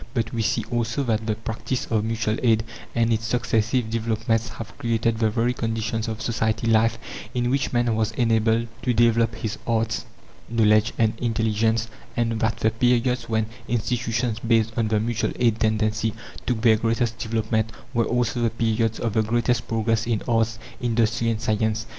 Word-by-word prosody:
But 115 Hz, -2 st, -1 dB
we 115 Hz, -, -1 dB
see 110 Hz, 0 st, 0 dB
also 120 Hz, +3 st, 0 dB
that 110 Hz, -3 st, -1 dB
the 110 Hz, -, +1 dB
practice 115 Hz, +3 st, -3 dB
of 110 Hz, -2 st, 0 dB
mutual 110 Hz, 0 st, -1 dB
aid 110 Hz, -3 st, +3 dB, 0.3 s
and 115 Hz, -1 st, +3 dB
its 110 Hz, 0 st, -1 dB
successive 115 Hz, 0 st, +1 dB
developments 115 Hz, 0 st, 0 dB
have 115 Hz, -1 st, -9 dB
created 115 Hz, -1 st, 0 dB
the 110 Hz, -1 st, +3 dB
very 120 Hz, +3 st, +1 dB
conditions 115 Hz, -1 st, -2 dB
of 110 Hz, -1 st, -4 dB
society 110 Hz, -1 st, 0 dB
life 115 Hz, 0 st, +3 dB, 0.4 s
in 120 Hz, 0 st, +1 dB
which 135 Hz, 0 st, 0 dB
man 120 Hz, -2 st, +1 dB
was 110 Hz, -1 st, 0 dB
enabled 115 Hz, 0 st, +2 dB
to 125 Hz, -2 st, 0 dB
develop 115 Hz, 0 st, +3 dB
his 110 Hz, -1 st, -4 dB
arts, 115 Hz, -1 st, 0 dB, 0.4 s
knowledge, 110 Hz, -1 st, +3 dB
and 110 Hz, -2 st, +3 dB
intelligence; 115 Hz, -1 st, +1 dB, 0.3 s
and 115 Hz, -1 st, 0 dB
that 115 Hz, +1 st, 0 dB
the 110 Hz, -, +2 dB
periods 125 Hz, +1 st, +1 dB
when 110 Hz, -1 st, +1 dB, 0.2 s
institutions 115 Hz, -1 st, -1 dB
based 115 Hz, -1 st, +2 dB
on 115 Hz, -2 st, +1 dB
the 110 Hz, 0 st, +2 dB
mutual 115 Hz, +1 st, -1 dB
aid 115 Hz, -3 st, +2 dB
tendency 110 Hz, 0 st, +1 dB, 0.3 s
took 120 Hz, -3 st, 0 dB
their 110 Hz, -2 st, +5 dB
greatest 115 Hz, +1 st, 0 dB
development 110 Hz, 0 st, -1 dB, 0.2 s
were 115 Hz, -2 st, +2 dB
also 120 Hz, 0 st, 0 dB
the 115 Hz, -, +3 dB
periods 115 Hz, 0 st, 0 dB
of 115 Hz, -3 st, -1 dB
the 110 Hz, -, +3 dB
greatest 120 Hz, +1 st, 0 dB
progress 115 Hz, 0 st, 0 dB
in 115 Hz, -3 st, 0 dB
arts, 115 Hz, -1 st, +1 dB, 0.2 s
industry, 115 Hz, -1 st, +1 dB
and 110 Hz, -1 st, -1 dB
science. 110 Hz, 0 st, 0 dB
115 Hz, 170 wpm, -24 LUFS, 110-115 Hz, 0.4 s, their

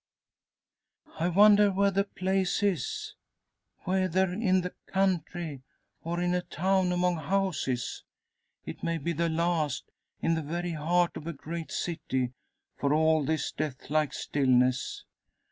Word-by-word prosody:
"I 165 Hz, -, +2 dB
wonder 205 Hz, +2 st, +6 dB
where 200 Hz, +1 st, +2 dB
the 200 Hz, +1 st, +1 dB
place 190 Hz, 0 st, 0 dB
is? 185 Hz, -, -1 dB, 0.7 s
Whether 185 Hz, 0 st, +1 dB
in 185 Hz, -2 st, +2 dB
the 180 Hz, 0 st, -5 dB
country, 175 Hz, -6 st, -1 dB, 0.4 s
or 170 Hz, +1 st, -2 dB
in 175 Hz, 0 st, +1 dB
a 180 Hz, -, +1 dB
town 185 Hz, +1 st, +1 dB
among 180 Hz, -1 st, +1 dB
houses? 155 Hz, -7 st, -1 dB, 0.6 s
It -, -, -7 dB
may 165 Hz, 0 st, -1 dB
be 170 Hz, +3 st, -2 dB
the 170 Hz, +1 st, 0 dB
last 160 Hz, -4 st, -1 dB, 0.3 s
in 165 Hz, -, +1 dB
the 160 Hz, -, 0 dB
very 170 Hz, +4 st, -3 dB
heart 170 Hz, +3 st, +1 dB
of 155 Hz, -, -8 dB
a 170 Hz, -, -3 dB
great 165 Hz, +3 st, -6 dB
city, 130 Hz, -7 st, -2 dB, 0.4 s
for 145 Hz, +1 st, +1 dB
all 160 Hz, 0 st, +3 dB
this 155 Hz, +2 st, -1 dB
death 145 Hz, -2 st, -5 dB
like 155 Hz, -1 st, +2 dB
stillness! 130 Hz, -2 st, +1 dB
170 Hz, 135 wpm, -29 LUFS, 155-185 Hz, 0.7 s, wonder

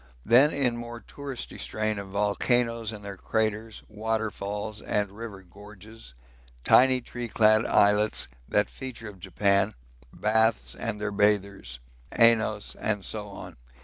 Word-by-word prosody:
Then 130 Hz, +6 st, +6 dB
in 125 Hz, -5 st, +1 dB
more 120 Hz, 0 st, -7 dB
touristy 140 Hz, 0 st, -7 dB
strain 110 Hz, -1 st, -2 dB
of 100 Hz, -, -7 dB
volcanoes 115 Hz, +3 st, 0 dB
and 105 Hz, -2 st, -9 dB
their 100 Hz, -1 st, -7 dB
craters, 110 Hz, +1 st, -2 dB
waterfalls 105 Hz, -1 st, -3 dB
and 105 Hz, -2 st, -1 dB
river 100 Hz, -2 st, -8 dB
gorges, 105 Hz, -, -14 dB, 0.5 s
tiny 130 Hz, 0 st, +5 dB
tree 120 Hz, 0 st, -6 dB
clad 110 Hz, 0 st, +4 dB
islets, 105 Hz, +1 st, +3 dB, 0.2 s
that 105 Hz, -, +2 dB
feature 120 Hz, -4 st, -7 dB
of 100 Hz, -2 st, -13 dB
Japan 100 Hz, -1 st, +1 dB, 0.4 s
baths 110 Hz, -, +1 dB
and 105 Hz, -, -4 dB
their 105 Hz, 0 st, -2 dB
bathers, 100 Hz, -11 st, 0 dB, 0.4 s
Ainos, 110 Hz, -2 st, +3 dB
and 105 Hz, -2 st, -2 dB
so 105 Hz, -1 st, -4 dB
on. 100 Hz, -, -10 dB
105 Hz, 130 wpm, -27 LUFS, 100-115 Hz, 0.5 s, Then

